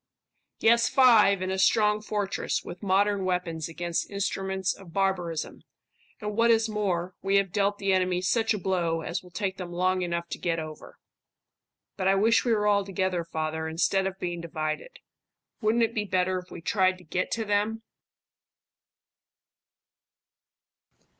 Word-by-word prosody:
"Yes, 235 Hz, +1 st, +4 dB
five, 215 Hz, -7 st, +5 dB
in 185 Hz, -, -2 dB
a 190 Hz, -, -2 dB
strong 210 Hz, +1 st, +3 dB
fortress, 205 Hz, -2 st, -2 dB
with 175 Hz, -, -9 dB
modern 200 Hz, 0 st, +2 dB
weapons 180 Hz, -3 st, -2 dB
against 170 Hz, +1 st, -3 dB
instruments 190 Hz, -1 st, -1 dB
of 180 Hz, -4 st, -14 dB
barbarism; 180 Hz, -5 st, -1 dB, 0.6 s
and 210 Hz, -1 st, -4 dB
what 230 Hz, +1 st, +3 dB
is 225 Hz, -1 st, +4 dB
more, 185 Hz, -4 st, -2 dB
we 195 Hz, +1 st, +1 dB
have 195 Hz, -2 st, +2 dB
dealt 205 Hz, 0 st, +1 dB
the 195 Hz, -1 st, +1 dB
enemy 185 Hz, -1 st, +1 dB
such 225 Hz, +4 st, +1 dB
a 215 Hz, -, +1 dB
blow 175 Hz, -4 st, -1 dB
as 170 Hz, +2 st, -3 dB
will 180 Hz, -, -15 dB
take 190 Hz, +1 st, -3 dB
them 180 Hz, -2 st, -6 dB
long 185 Hz, +1 st, +1 dB
enough 170 Hz, -1 st, -2 dB
to -, -, -5 dB
get 170 Hz, -2 st, -1 dB
over." 155 Hz, -1 st, -8 dB, 1.0 s
"But 190 Hz, -1 st, 0 dB
I 195 Hz, -, +4 dB
wish 225 Hz, +3 st, +3 dB
we 240 Hz, -, 0 dB
were 210 Hz, -2 st, +2 dB
all 205 Hz, -1 st, +3 dB
together, 185 Hz, -2 st, -1 dB
father, 160 Hz, -1 st, -3 dB
instead 190 Hz, +4 st, +1 dB
of 190 Hz, 0 st, -5 dB
being 175 Hz, -2 st, -4 dB
divided. 165 Hz, -, -4 dB, 0.6 s
Wouldn't 225 Hz, +2 st, +2 dB
it 225 Hz, 0 st, 0 dB
be 210 Hz, -2 st, -1 dB
better 185 Hz, -1 st, 0 dB
if 180 Hz, -, -13 dB
we -, -, -9 dB
tried 185 Hz, +1 st, +2 dB
to 180 Hz, -, -16 dB
get 180 Hz, +3 st, -2 dB
to 225 Hz, -1 st, -2 dB
them?" 210 Hz, +2 st, 0 dB
190 Hz, 160 wpm, -27 LUFS, 175-210 Hz, 1.0 s, five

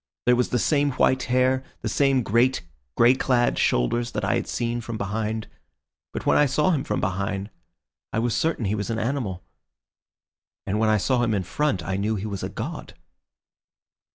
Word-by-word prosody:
There 125 Hz, -, +5 dB
was 125 Hz, 0 st, +1 dB
the 125 Hz, -, +1 dB
same 145 Hz, +3 st, +2 dB
white 130 Hz, 0 st, +2 dB
hair, 130 Hz, +1 st, +2 dB, 0.2 s
the -, -, -2 dB
same 135 Hz, -3 st, +2 dB
great, 120 Hz, +5 st, +2 dB, 0.3 s
grey 120 Hz, +2 st, +6 dB
clad 125 Hz, -2 st, +1 dB
shoulders 120 Hz, -, +1 dB
that 105 Hz, -2 st, -2 dB
I 100 Hz, -, +1 dB
had -, -, -1 dB
seen 120 Hz, 0 st, -2 dB
from 115 Hz, -1 st, -5 dB
behind. 110 Hz, +2 st, -3 dB, 0.6 s
But -, -, -5 dB
when -, -, +4 dB
I 150 Hz, -, +5 dB
saw 150 Hz, +7 st, +2 dB
him 145 Hz, -6 st, 0 dB
from -, -, -2 dB
behind 100 Hz, +2 st, -2 dB, 0.6 s
I -, -, -2 dB
was 115 Hz, 0 st, +1 dB
certain 160 Hz, -8 st, 0 dB
he 100 Hz, -, 0 dB
was 100 Hz, -2 st, -3 dB
an 115 Hz, -, -1 dB
animal, 115 Hz, -6 st, -2 dB, 1.2 s
and 100 Hz, +2 st, -1 dB
when 110 Hz, 0 st, +3 dB
I 110 Hz, -, +4 dB
saw 125 Hz, +5 st, +1 dB
him 115 Hz, -3 st, +1 dB
in 95 Hz, -, -1 dB
front 100 Hz, -, -1 dB
I 95 Hz, +3 st, -2 dB
knew 105 Hz, +3 st, 0 dB
he 100 Hz, 0 st, -4 dB
was 100 Hz, -3 st, -4 dB
a -, -, -3 dB
god." -, -, -6 dB
115 Hz, 190 wpm, -24 LUFS, 100-130 Hz, 1.2 s, grey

